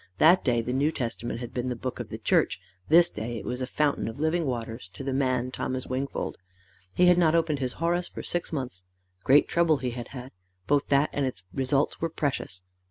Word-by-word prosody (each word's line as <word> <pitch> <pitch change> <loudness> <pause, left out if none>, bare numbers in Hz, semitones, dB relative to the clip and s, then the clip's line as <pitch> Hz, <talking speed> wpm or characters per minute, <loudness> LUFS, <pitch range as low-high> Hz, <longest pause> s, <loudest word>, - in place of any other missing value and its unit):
That 175 - +6
day 120 -3 +2
the 125 +2 -3
New 140 +4 +2
Testament 120 -3 -4
had 120 - -7
been 125 0 -2
the 125 - -2
book 125 +2 -5
of - - -5
the - - -5
church - - +2 0.3
this 170 +2 +7
day 120 -5 -5
it - - -7
was 125 +1 -3
a 130 - -2
fountain 145 -2 0
of 115 +5 -6
living 160 +1 +1
waters 115 -5 -4
to 100 - -8
the 135 0 -2
man 130 -2 0
Thomas 130 0 -3
Wingfold. 130 +2 -3 0.6
He 180 - +5
had 180 0 +6
not 165 -2 +4
opened 160 -3 +1
his 130 -2 -2
Horace 175 +2 0
for - - -8
six 175 - -2
months. 125 - -4 0.4
Great 145 +3 +5
trouble 170 -3 +3
he 125 -2 -3
had 120 0 -6
had; 130 0 -9 0.3
both 145 +3 +2
that 140 +1 +3
and 140 -2 0
its 95 -8 -6
results 135 +1 0
were 165 - 0
precious. 135 - -3
135 Hz, 220 wpm, -27 LUFS, 125-155 Hz, 0.6 s, this